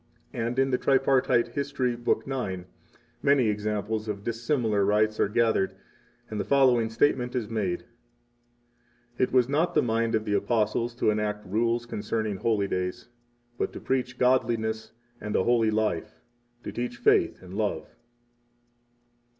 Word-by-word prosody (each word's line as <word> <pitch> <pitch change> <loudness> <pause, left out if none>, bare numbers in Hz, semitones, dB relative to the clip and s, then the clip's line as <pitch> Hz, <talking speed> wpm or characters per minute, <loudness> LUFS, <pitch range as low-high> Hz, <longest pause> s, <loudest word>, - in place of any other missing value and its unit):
45 115 -1 -2
And 120 +2 -3
in 135 0 +2
the 125 - +1
Tripartite 130 -3 +3
History, 135 -2 -1
Book 120 0 0
9, 100 -10 -3 0.6
many 140 -5 +3
examples 105 +1 -2
of 100 -1 -4
dissimilar 115 -2 0
rites 105 +2 +2
are - - +2
gathered, 110 -3 +1 0.5
and 110 - -5
the - - 0
following 125 -5 +3
statement 125 +1 +1
is 120 -4 -1
made: 100 -6 -2 1.3
It 130 - +2
was 125 -2 +4
not 150 +6 0
the - - +4
mind 115 -1 +1
of 110 0 -1
the 105 - -1
Apostles 115 +2 0
to 115 - +2
enact 105 -1 -2
rules 115 +4 0
concerning 110 -2 -3
holy 105 -1 +1
days, 90 +2 -3 0.5
but - - -1
to - - -7
preach 125 -2 -2
godliness 115 -3 +1 0.3
and 105 0 -3
a - - +3
holy 115 -1 +3
life 105 -7 -1 0.5
[to - - -5
teach 120 0 -4
faith - - +3
and 90 0 -11
love]. 100 -6 -2
115 Hz, 150 wpm, -27 LUFS, 105-125 Hz, 1.3 s, was